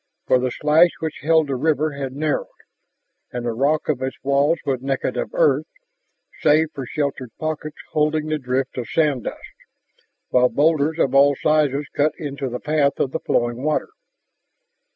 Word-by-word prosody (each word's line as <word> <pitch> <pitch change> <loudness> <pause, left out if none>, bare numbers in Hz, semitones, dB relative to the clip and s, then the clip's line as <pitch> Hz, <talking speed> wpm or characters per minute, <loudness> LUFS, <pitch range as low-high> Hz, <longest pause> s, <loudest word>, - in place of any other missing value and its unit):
For 130 - +3
the 130 0 0
slash 155 +6 +4
which 160 -1 -4
held 160 +1 +3
the 140 -2 -2
river 155 +3 +1
had 135 -2 -5
narrowed. 150 +1 -1 0.8
And 120 -1 -4
the 120 - 0
rock 140 +7 0
of 140 -4 -1
its 130 0 -3
walls 140 +4 +2
was 135 -3 -1
naked 135 0 -2
of - - -2
earth, - - +3 0.7
save 155 +1 +3
for 135 -3 -6
sheltered 140 -4 -3
pockets 155 -1 -4
holding 155 0 +1
the 155 0 -1
drift 130 0 -2
of 120 - -5
sand 150 -7 +1
dust, - - -7 0.8
while 125 0 +4
boulders 155 +1 +2
of 135 -5 +1
all 140 +1 +5
sizes 150 -1 +1
cut 150 +2 +2
into 140 -2 -4
the 125 +1 -4
path 150 -2 +1
of 130 - 0
the 160 - -2
flowing 120 +1 -1
water. 155 +1 0
145 Hz, 170 wpm, -21 LUFS, 130-155 Hz, 0.8 s, all